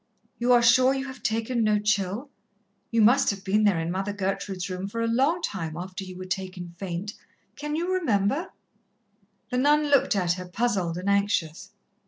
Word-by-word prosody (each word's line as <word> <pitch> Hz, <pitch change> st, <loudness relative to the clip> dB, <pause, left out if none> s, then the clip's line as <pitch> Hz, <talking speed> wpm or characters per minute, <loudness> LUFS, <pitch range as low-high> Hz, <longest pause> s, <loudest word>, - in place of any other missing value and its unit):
"You 240 Hz, +1 st, +2 dB
are 240 Hz, -1 st, +5 dB
sure 255 Hz, +3 st, +5 dB
you 270 Hz, 0 st, -3 dB
have 260 Hz, -1 st, -9 dB
taken 225 Hz, +1 st, 0 dB
no 215 Hz, -1 st, +3 dB
chill? 210 Hz, +5 st, -1 dB, 0.6 s
You 230 Hz, -2 st, +3 dB
must 255 Hz, +5 st, +5 dB
have 200 Hz, -1 st, -3 dB
been 210 Hz, +2 st, +2 dB
there 195 Hz, -5 st, +3 dB
in 165 Hz, +1 st, -2 dB
Mother 195 Hz, +2 st, -2 dB
Gertrude's 195 Hz, -1 st, -3 dB
room 185 Hz, 0 st, -4 dB
for 230 Hz, +3 st, -5 dB
a -, -, +1 dB
long 275 Hz, +9 st, +1 dB
time 165 Hz, -, -3 dB
after 185 Hz, +2 st, -6 dB
you 185 Hz, -1 st, -9 dB
were 185 Hz, -, -7 dB
taken 185 Hz, -2 st, -5 dB
faint.... 195 Hz, +2 st, -4 dB, 0.4 s
Can 295 Hz, +1 st, -4 dB
you 350 Hz, +3 st, -1 dB
remember?" 275 Hz, -, 0 dB, 1.0 s
The 250 Hz, -, +1 dB
nun 295 Hz, +2 st, +3 dB
looked 280 Hz, -6 st, +3 dB
at 180 Hz, -3 st, +1 dB
her, 180 Hz, 0 st, -7 dB
puzzled 185 Hz, -4 st, -1 dB
and 180 Hz, +2 st, -5 dB
anxious. 200 Hz, -3 st, 0 dB
205 Hz, 185 wpm, -26 LUFS, 185-250 Hz, 1.0 s, are